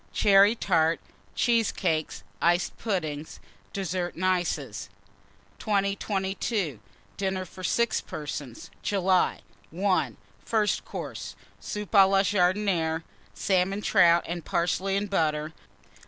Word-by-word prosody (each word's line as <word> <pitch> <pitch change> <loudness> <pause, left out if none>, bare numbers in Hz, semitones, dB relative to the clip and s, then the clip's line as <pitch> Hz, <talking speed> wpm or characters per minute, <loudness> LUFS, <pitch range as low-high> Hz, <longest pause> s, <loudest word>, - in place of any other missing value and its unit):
Cherry 200 +2 +5
Tart. 165 -6 +2 0.4
Cheesecakes. 200 -9 0 0.2
Iced 175 +1 +2
Pudding. 160 -8 -2 0.4
DESSERT 185 -2 -3
AND 185 - -2
ICES. 160 - -1 0.7
2022. 195 - -1 0.4
DINNER 190 -1 -1
FOR 185 0 -12
6 235 +4 +1
PERSONS 145 -5 -7
(July). 190 -2 +1 0.4
I. 185 - +2 0.3
FIRST 215 -3 0
COURSE. - - -6 0.2
Soup 210 -1 -6
à 195 -3 +7
la 195 0 +4
Jardinière. 180 -4 +1 0.3
Salmon 195 +1 +1
Trout 175 -5 +5
and 170 0 -4
Parsley 190 +4 0
and 205 +1 -1
Butter. 155 -5 0
185 Hz, 100 wpm, -27 LUFS, 165-200 Hz, 0.7 s, à